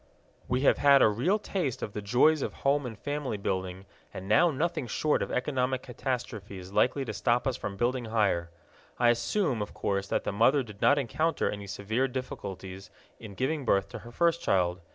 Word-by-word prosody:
We 125 Hz, +1 st, 0 dB
have 140 Hz, -, +4 dB
had 140 Hz, -1 st, +6 dB
a -, -, +7 dB
real 125 Hz, -, +1 dB
taste 185 Hz, -, -3 dB
of 105 Hz, -, -5 dB
the 105 Hz, -, -4 dB
joys 125 Hz, +9 st, +3 dB
of -, -, -3 dB
home 140 Hz, -1 st, +2 dB
and 115 Hz, -3 st, -8 dB
family 145 Hz, -5 st, -3 dB
building, 95 Hz, -1 st, -3 dB, 0.3 s
and 95 Hz, -, -8 dB
now 115 Hz, -, +5 dB
nothing 155 Hz, -2 st, -2 dB
short 150 Hz, +7 st, 0 dB
of -, -, -3 dB
economic 130 Hz, -1 st, -1 dB
catastrophe 120 Hz, -6 st, -4 dB
is 95 Hz, +1 st, -10 dB
likely 135 Hz, +5 st, +2 dB
to 110 Hz, -, -4 dB
stop 120 Hz, +4 st, +1 dB
us 130 Hz, -2 st, 0 dB
from 100 Hz, -1 st, -6 dB
building 120 Hz, +2 st, 0 dB
higher. 100 Hz, -6 st, +1 dB, 0.5 s
I 120 Hz, -1 st, +4 dB
assume, 120 Hz, -, 0 dB
of 105 Hz, -, -6 dB
course, 100 Hz, -1 st, -1 dB
that -, -, -1 dB
the -, -, -2 dB
mother 125 Hz, +7 st, +3 dB
did 105 Hz, -4 st, -13 dB
not 145 Hz, -, +5 dB
encounter 145 Hz, +5 st, 0 dB
any 100 Hz, -1 st, -7 dB
severe 110 Hz, +7 st, -1 dB
difficulties 95 Hz, -7 st, -7 dB, 0.3 s
in 105 Hz, -3 st, -10 dB
giving 145 Hz, +5 st, -1 dB
birth 100 Hz, -5 st, +1 dB
to 115 Hz, -, -7 dB
her 120 Hz, +2 st, -12 dB
first 170 Hz, +5 st, +1 dB
child. 90 Hz, -2 st, +1 dB
120 Hz, 195 wpm, -29 LUFS, 100-140 Hz, 0.5 s, a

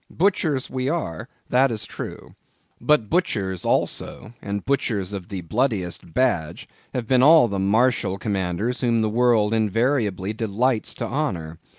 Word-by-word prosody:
Butchers 160 Hz, -7 st, +1 dB
we 130 Hz, 0 st, -2 dB
are, 145 Hz, -, -3 dB, 0.2 s
that 130 Hz, +2 st, +4 dB
is 110 Hz, -3 st, -3 dB
true. -, -, -8 dB, 0.5 s
But 150 Hz, -8 st, +2 dB
butchers, 100 Hz, -, -1 dB
also, 110 Hz, -, -2 dB
and 100 Hz, -1 st, -4 dB
butchers 110 Hz, -8 st, -1 dB
of 95 Hz, -3 st, -6 dB
the 95 Hz, -3 st, -4 dB
bloodiest 90 Hz, -, -2 dB
badge 120 Hz, -12 st, 0 dB, 0.3 s
have 125 Hz, -2 st, -2 dB
been 130 Hz, 0 st, +4 dB
all 155 Hz, -1 st, +7 dB
Martial 100 Hz, +1 st, +1 dB
Commanders 100 Hz, +4 st, -2 dB
whom 115 Hz, -3 st, +2 dB
the 110 Hz, -, +1 dB
world 115 Hz, -2 st, +3 dB
invariably 110 Hz, -2 st, 0 dB
delights 110 Hz, +2 st, 0 dB
to -, -, -3 dB
honor. 85 Hz, -, -3 dB
110 Hz, 135 wpm, -23 LUFS, 95-130 Hz, 0.5 s, all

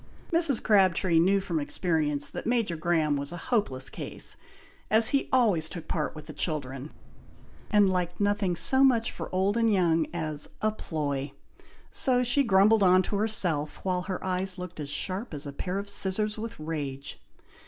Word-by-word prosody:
Mrs. 330 Hz, -7 st, +3 dB
Crabtree 185 Hz, -4 st, +3 dB
knew 195 Hz, +4 st, +3 dB
from 175 Hz, -4 st, -2 dB
experience, 150 Hz, -2 st, -1 dB
that -, -, -6 dB
Major 230 Hz, -7 st, 0 dB
Graham 155 Hz, -3 st, 0 dB
was 140 Hz, +1 st, -4 dB
a 175 Hz, -, -6 dB, 0.2 s
hopeless 135 Hz, -, +1 dB
case, -, -, -3 dB, 0.5 s
as 220 Hz, +1 st, +5 dB
he 275 Hz, -, 0 dB
always 205 Hz, -11 st, +2 dB
took 170 Hz, -4 st, -8 dB
part 155 Hz, -2 st, -3 dB
with 155 Hz, -1 st, -10 dB
the -, -, -9 dB
children, 140 Hz, -3 st, -3 dB, 0.8 s
and 205 Hz, -2 st, +4 dB
liked 180 Hz, -2 st, -2 dB
nothing 205 Hz, -3 st, 0 dB
so 265 Hz, +9 st, +6 dB
much 240 Hz, -4 st, +3 dB
for -, -, -7 dB
old 190 Hz, +4 st, 0 dB
and 230 Hz, -1 st, +2 dB
young 165 Hz, -5 st, +2 dB
as 155 Hz, -3 st, -4 dB
"a 215 Hz, -, +1 dB
ploy;" 145 Hz, -8 st, -4 dB, 0.6 s
so 250 Hz, -1 st, +2 dB
she 250 Hz, +4 st, +3 dB
grumbled 205 Hz, 0 st, +4 dB
on 185 Hz, -1 st, +5 dB
to 200 Hz, -, -3 dB
herself, 180 Hz, -9 st, +1 dB
while 185 Hz, -1 st, -1 dB
her 185 Hz, 0 st, -5 dB
eyes 185 Hz, 0 st, 0 dB
looked 180 Hz, -2 st, -8 dB
as 145 Hz, -2 st, -5 dB
sharp 185 Hz, +5 st, -3 dB
as 145 Hz, -, -4 dB
a 140 Hz, -, -6 dB
pair 180 Hz, +6 st, -4 dB
of 200 Hz, +1 st, -4 dB
scissors 200 Hz, +2 st, 0 dB
with 225 Hz, -2 st, -7 dB
rage. 145 Hz, -3 st, -5 dB
185 Hz, 175 wpm, -27 LUFS, 155-210 Hz, 0.8 s, so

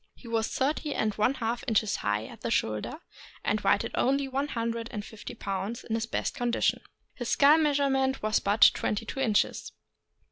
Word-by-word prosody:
He 245 Hz, -, -14 dB
was 225 Hz, -1 st, 0 dB
thirty 290 Hz, +2 st, -1 dB
and 215 Hz, -1 st, 0 dB
one 215 Hz, +7 st, +1 dB
half 235 Hz, -1 st, -2 dB
inches 215 Hz, -3 st, +1 dB
high 105 Hz, +1 st, -1 dB
at -, -, -12 dB
the -, -, -2 dB
shoulder, 110 Hz, -, -1 dB, 0.4 s
and -, -, 0 dB
weighed -, -, +2 dB
only 275 Hz, +2 st, +1 dB
one 270 Hz, +2 st, -1 dB
hundred 230 Hz, -3 st, -3 dB
and 210 Hz, -1 st, -5 dB
fifty 220 Hz, -2 st, -9 dB
pounds 195 Hz, +5 st, -4 dB
in 220 Hz, -, -5 dB
his 225 Hz, 0 st, -1 dB
best -, -, -2 dB
condition. 240 Hz, -1 st, 0 dB, 0.3 s
His 245 Hz, -2 st, -5 dB
skull 295 Hz, +3 st, +6 dB
measurement 275 Hz, -4 st, +1 dB
was 215 Hz, 0 st, +2 dB
but 205 Hz, +2 st, +5 dB
twenty 210 Hz, +2 st, -2 dB
two 265 Hz, -, -6 dB
inches. 220 Hz, -6 st, 0 dB
230 Hz, 180 wpm, -28 LUFS, 215-270 Hz, 0.4 s, skull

